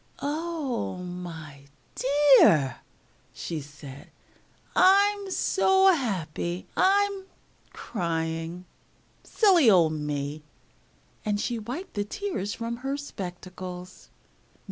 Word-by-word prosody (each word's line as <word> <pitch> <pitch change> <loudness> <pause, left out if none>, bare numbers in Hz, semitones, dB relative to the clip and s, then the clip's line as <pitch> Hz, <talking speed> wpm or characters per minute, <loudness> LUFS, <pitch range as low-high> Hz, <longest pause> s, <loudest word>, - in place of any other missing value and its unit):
] - - -26
"Oh, 295 - -3
my 170 -6 -8 0.3
dear!" 265 - +5 0.6
she 165 -3 -5
said. 140 -1 -12 0.7
"I'm 400 +1 +4
so 380 0 +4
happy 180 - -3
I'm 395 0 +2 0.5
crying. 165 -1 -3 0.6
Silly 365 - +4
old 170 -6 +5
me!" 150 0 -3 0.8
and 210 -2 -1
she 235 +1 -2
wiped 250 - -6
the 205 - -1
tears 285 - -4
from 235 0 -4
her 270 +3 -3
spectacles. 185 -6 -8
205 Hz, 90 wpm, -26 LUFS, -, 0.8 s, dear